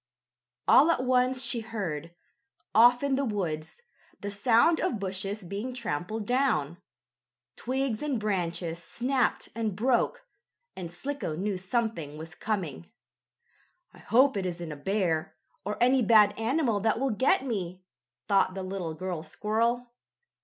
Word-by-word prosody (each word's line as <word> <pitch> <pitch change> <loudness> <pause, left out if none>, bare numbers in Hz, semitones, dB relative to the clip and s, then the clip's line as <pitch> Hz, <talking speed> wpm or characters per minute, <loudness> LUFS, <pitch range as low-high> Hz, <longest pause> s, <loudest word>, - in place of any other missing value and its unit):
All 315 - +7
at 260 -6 +2
once 255 0 +2
she 240 -1 -1
heard, 175 -8 -5 0.6
off 245 +4 +6
in 280 -1 +1
the 280 - +1
woods, 190 - -3 0.4
the 205 - -4
sound 235 +10 +4
of 265 - -1
bushes 195 +1 -3
being 205 +8 -5
trampled 215 -1 -3
down. 205 - +1 0.8
Twigs 260 -2 -2
and 290 -5 -1
branches 175 -5 -2
snapped 255 +6 -1
and 220 -4 -2
broke, 245 - +1 0.5
and 175 -3 -6
Slicko 270 - -4
knew 195 +4 -1
something 185 - -2
was 160 +1 -8
coming. 180 - -4 1.0
"I - - -16
hope 255 +4 +4
it 190 -2 -1
isn't 170 -2 -5
a - - -5
bear, 170 0 -1 0.3
or 210 +2 -3
any 255 +2 +4
bad 215 -2 +6
animal 230 -1 +1
that 220 +2 +1
will 270 0 +1
get 260 +4 +2
me," 185 -6 -4 0.4
thought 195 -1 +3
the 190 - -4
little 185 -4 -4
girl 180 -1 -4
squirrel. 230 +8 -1
210 Hz, 140 wpm, -28 LUFS, 180-245 Hz, 1.0 s, All